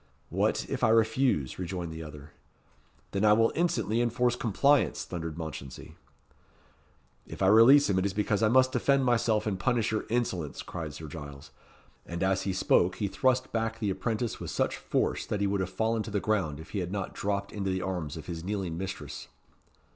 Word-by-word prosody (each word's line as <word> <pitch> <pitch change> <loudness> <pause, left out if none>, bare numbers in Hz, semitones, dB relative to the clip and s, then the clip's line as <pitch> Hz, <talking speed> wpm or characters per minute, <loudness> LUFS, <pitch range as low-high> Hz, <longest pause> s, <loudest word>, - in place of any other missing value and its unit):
"What, - - 0
if - - -4
I - - +5
refuse?" 110 - +2
rejoined 90 -2 -4
the 80 - -7
other. 75 -1 -10 0.8
"Then 100 +1 -1
I 105 -1 +6
will 115 +1 +3
instantly 120 - 0
enforce 120 +1 +1
compliance," 120 - +2
thundered 80 -1 -5
Mounchensey. 80 -5 -7 1.3
"If - - -5
I - - +4
release 125 +7 +7
him 95 -2 +2
it 95 - 0
is 95 - -4
because 105 -1 0
I 110 - +4
must 130 +3 +4
defend 135 +1 +2
myself 115 -3 +2
and 100 -3 -2
punish 115 +1 +1
your 110 - -1
insolence," 95 - -2
cried 80 -5 -6
Sir 80 - -8
Giles. 70 -2 -9 0.6
And 85 +1 -3
as 95 0 +2
he - - +2
spoke, 90 -1 +3
he 105 - -1
thrust 130 +5 +1
back 115 0 -1
the 105 -3 -1
apprentice 110 +4 -2
with - - -6
such - - 0
force - - -1
that 105 - -2
he 100 - +1
would 100 0 0
have 95 - -2
fallen 110 +4 0
to 110 - -6
the 100 -1 0
ground 95 -8 -1
if 80 - -11
he 100 - -2
had 90 -1 -3
not 100 -2 -3
dropped 100 0 -2
into 100 -2 -3
the 95 -1 -1
arms 85 -6 -3
of 80 - -8
his 85 -2 -6
kneeling 95 -4 -3
mistress. 95 0 -6
100 Hz, 195 wpm, -29 LUFS, 85-115 Hz, 1.3 s, release